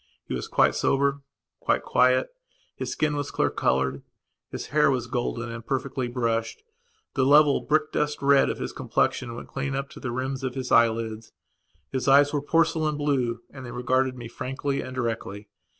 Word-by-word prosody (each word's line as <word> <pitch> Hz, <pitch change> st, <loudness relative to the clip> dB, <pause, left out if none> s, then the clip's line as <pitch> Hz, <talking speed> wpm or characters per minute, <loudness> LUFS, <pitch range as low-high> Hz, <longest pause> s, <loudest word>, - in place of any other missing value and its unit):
He -, -, -5 dB
was 60 Hz, -, -3 dB
quite -, -, +3 dB
sober, 140 Hz, +1 st, +1 dB, 0.4 s
quite -, -, +1 dB
quiet, 125 Hz, +1 st, +3 dB, 0.5 s
his -, -, -4 dB
skin 150 Hz, -1 st, 0 dB
was 145 Hz, 0 st, -3 dB
clear -, -, 0 dB
coloured; 65 Hz, +1 st, 0 dB, 0.5 s
his -, -, -6 dB
hair 150 Hz, 0 st, +4 dB
was 130 Hz, -3 st, 0 dB
golden 120 Hz, -1 st, -3 dB
and 115 Hz, 0 st, -7 dB
perfectly 135 Hz, 0 st, -2 dB
brushed; 115 Hz, -2 st, -2 dB, 0.5 s
the 135 Hz, -, +1 dB
level 145 Hz, +1 st, +5 dB
brick 155 Hz, 0 st, +1 dB
dust 150 Hz, 0 st, -1 dB
red 140 Hz, 0 st, +4 dB
of -, -, -2 dB
his -, -, -5 dB
complexion 115 Hz, -1 st, -1 dB
went -, -, -9 dB
clean 135 Hz, 0 st, -3 dB
up 140 Hz, 0 st, -4 dB
to -, -, -11 dB
the 130 Hz, -, -4 dB
rims 130 Hz, +2 st, -3 dB
of 130 Hz, -1 st, -3 dB
his 130 Hz, -1 st, -4 dB
eyelids; 115 Hz, -1 st, +2 dB, 0.6 s
his 130 Hz, 0 st, -2 dB
eyes 140 Hz, +2 st, +6 dB
were 145 Hz, -, 0 dB
porcelain 160 Hz, 0 st, +1 dB
blue 130 Hz, -5 st, 0 dB
and 135 Hz, -2 st, -10 dB
they 125 Hz, -, -7 dB
regarded 130 Hz, +1 st, 0 dB
me 120 Hz, -1 st, -7 dB
frankly 135 Hz, +4 st, -3 dB
and 130 Hz, -, -7 dB
directly. 110 Hz, -4 st, -4 dB
130 Hz, 180 wpm, -26 LUFS, 120-140 Hz, 0.6 s, eyes